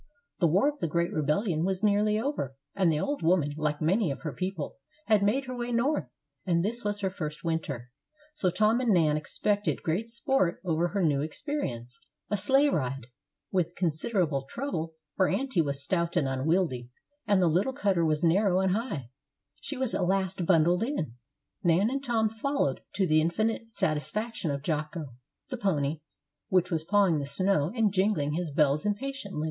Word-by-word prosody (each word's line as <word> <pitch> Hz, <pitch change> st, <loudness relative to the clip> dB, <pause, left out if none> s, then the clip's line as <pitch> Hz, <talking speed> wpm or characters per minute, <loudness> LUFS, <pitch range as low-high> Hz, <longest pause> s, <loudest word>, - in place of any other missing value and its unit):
The 170 Hz, -, +4 dB
war 190 Hz, -, +3 dB
of 295 Hz, 0 st, -2 dB
the -, -, -1 dB
great 170 Hz, +4 st, 0 dB
rebellion 155 Hz, +2 st, 0 dB
was 190 Hz, +2 st, -1 dB
nearly 210 Hz, +1 st, +3 dB
over, 220 Hz, -, -2 dB, 0.2 s
and 185 Hz, -4 st, +3 dB
the 150 Hz, -, 0 dB
old 285 Hz, -, -2 dB
woman, 160 Hz, -3 st, +2 dB
like 150 Hz, 0 st, -1 dB
many 190 Hz, +3 st, +2 dB
of 140 Hz, -, -4 dB
her 155 Hz, -4 st, -4 dB
people, 185 Hz, -5 st, -4 dB, 0.3 s
had 215 Hz, -3 st, +4 dB
made 230 Hz, +7 st, +2 dB
her 255 Hz, -1 st, -5 dB
way 240 Hz, 0 st, -3 dB
North, 260 Hz, +6 st, +1 dB, 0.4 s
and 170 Hz, -1 st, +1 dB
this 235 Hz, +3 st, -2 dB
was 205 Hz, 0 st, -2 dB
her 190 Hz, -1 st, 0 dB
first 155 Hz, -5 st, -5 dB
winter; 145 Hz, -7 st, -3 dB, 0.4 s
so 190 Hz, -11 st, +1 dB
Tom 215 Hz, +6 st, +2 dB
and 245 Hz, -3 st, +2 dB
Nan 160 Hz, -5 st, +4 dB
expected 205 Hz, +7 st, -1 dB
great 185 Hz, +7 st, -1 dB
sport 235 Hz, -5 st, +1 dB
over 170 Hz, 0 st, +1 dB
her 195 Hz, +1 st, -1 dB
new 145 Hz, -4 st, +2 dB
experience 145 Hz, -, -4 dB, 0.3 s
a -, -, +3 dB
sleigh 270 Hz, +9 st, +4 dB
ride. 135 Hz, -, -2 dB, 0.5 s
With 180 Hz, -2 st, 0 dB
considerable 165 Hz, -2 st, 0 dB
trouble, 165 Hz, -, -4 dB, 0.2 s
for 190 Hz, -, +3 dB
aunty 260 Hz, -10 st, +1 dB
was 140 Hz, -2 st, -2 dB
stout 170 Hz, +1 st, 0 dB
and 135 Hz, -, +2 dB
unwieldy, 135 Hz, -2 st, 0 dB, 0.4 s
and 200 Hz, -2 st, +4 dB
the 180 Hz, -, +4 dB
little 180 Hz, +10 st, +2 dB
cutter 200 Hz, -10 st, +1 dB
was 155 Hz, 0 st, +1 dB
narrow 185 Hz, +2 st, +3 dB
and 190 Hz, -1 st, +2 dB
high, 175 Hz, -, -3 dB, 0.5 s
she 285 Hz, -, -5 dB
was 260 Hz, -2 st, -1 dB
at 180 Hz, -, +1 dB
last 190 Hz, -2 st, 0 dB
bundled 175 Hz, 0 st, +4 dB
in, 225 Hz, -, -2 dB, 0.5 s
Nan 180 Hz, +7 st, +3 dB
and 275 Hz, +1 st, -2 dB
Tom 230 Hz, -4 st, +1 dB
following, 225 Hz, -, -1 dB, 0.2 s
to 195 Hz, -, +2 dB
the 155 Hz, -2 st, +4 dB
infinite 220 Hz, +7 st, -1 dB
satisfaction 205 Hz, -, -1 dB
of 140 Hz, -1 st, -3 dB
Jocko, 150 Hz, -3 st, -3 dB, 0.4 s
the 255 Hz, -, -4 dB
pony, 155 Hz, -8 st, 0 dB, 0.5 s
which 185 Hz, -1 st, +2 dB
was 160 Hz, -2 st, 0 dB
pawing 190 Hz, -3 st, +3 dB
the 140 Hz, -, -3 dB
snow 160 Hz, +1 st, +2 dB
and 220 Hz, -4 st, +2 dB
jingling 185 Hz, -7 st, +1 dB
his 170 Hz, 0 st, -2 dB
bells 145 Hz, 0 st, +2 dB
impatiently. 210 Hz, -, -3 dB
180 Hz, 180 wpm, -28 LUFS, 155-215 Hz, 0.5 s, The